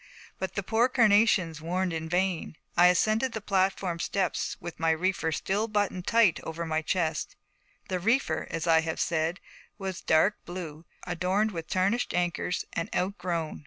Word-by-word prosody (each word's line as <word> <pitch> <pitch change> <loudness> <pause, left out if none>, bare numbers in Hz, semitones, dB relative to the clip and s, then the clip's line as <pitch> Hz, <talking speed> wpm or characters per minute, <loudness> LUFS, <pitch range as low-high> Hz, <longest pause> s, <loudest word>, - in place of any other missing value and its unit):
But 190 -1 -4
the 200 - -1
poor 225 +5 +2
carnations 210 - +3
warned 180 +2 -1
in 160 0 -4
vain. 180 -2 -1 0.2
I 175 +1 +7
ascended 215 +8 +2
the 220 - -3
platform 190 -3 0
steps 185 -3 -1
with 175 -3 -8
my 165 0 +2
reefer 160 0 0
still 200 +7 -1
buttoned 205 -4 -1
tightly 225 -7 +4
over 165 +1 -4
my 160 -1 0
chest. 160 -1 -1 0.5
The 185 - -2
reefer, 230 +9 +1
as 165 0 -3
I 165 -1 +5
have 160 0 -3
said, 165 +1 0 0.4
was 190 -2 -5
dark 160 +6 +2
blue, 170 -3 -7 0.2
adorned 185 +5 0
with 165 -4 -6
tarnished 195 +6 0
anchors, 175 0 -1
and 165 - -2
outgrown. 175 -4 -2
180 Hz, 160 wpm, -28 LUFS, 165-200 Hz, 0.5 s, I